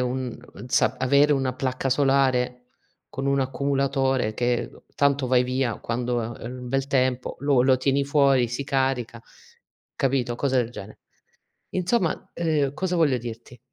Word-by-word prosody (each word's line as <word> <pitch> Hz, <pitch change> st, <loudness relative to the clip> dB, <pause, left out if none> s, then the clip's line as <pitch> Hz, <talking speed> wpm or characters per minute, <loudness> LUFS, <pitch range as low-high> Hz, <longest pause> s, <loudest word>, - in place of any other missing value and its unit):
un 125 Hz, -1 st, -2 dB, 0.3 s
za -, -, +2 dB
avere 140 Hz, +3 st, +4 dB
una 135 Hz, -2 st, 0 dB
placca 130 Hz, 0 st, -2 dB
solare 130 Hz, -2 st, +2 dB, 0.5 s
con 135 Hz, +1 st, -5 dB
un 140 Hz, 0 st, +2 dB
accumulatore 135 Hz, -3 st, 0 dB
che 120 Hz, 0 st, -1 dB, 0.2 s
tanto 140 Hz, -1 st, +2 dB
vai 125 Hz, 0 st, +3 dB
via 125 Hz, -2 st, -1 dB
quando 120 Hz, +1 st, -2 dB
ha 115 Hz, 0 st, -6 dB
il 125 Hz, +1 st, -6 dB
bel 135 Hz, +2 st, -1 dB
tempo, 130 Hz, -2 st, 0 dB
lo 140 Hz, -3 st, +3 dB
lo 130 Hz, 0 st, +4 dB
tieni 135 Hz, +2 st, +1 dB
fuori, 140 Hz, -4 st, +3 dB
si 125 Hz, +4 st, -4 dB
carica, 130 Hz, -4 st, -1 dB, 0.7 s
capito, 130 Hz, -3 st, 0 dB
cose 135 Hz, -1 st, 0 dB
del 120 Hz, -1 st, 0 dB
gene. 105 Hz, -3 st, -10 dB, 0.7 s
Insomma, 185 Hz, 0 st, -1 dB
ehm, 150 Hz, -5 st, 0 dB
cosa 180 Hz, +3 st, -2 dB
voglio 145 Hz, -7 st, +3 dB
dirti 120 Hz, +1 st, -9 dB
130 Hz, 145 wpm, -24 LUFS, 125-140 Hz, 0.7 s, avere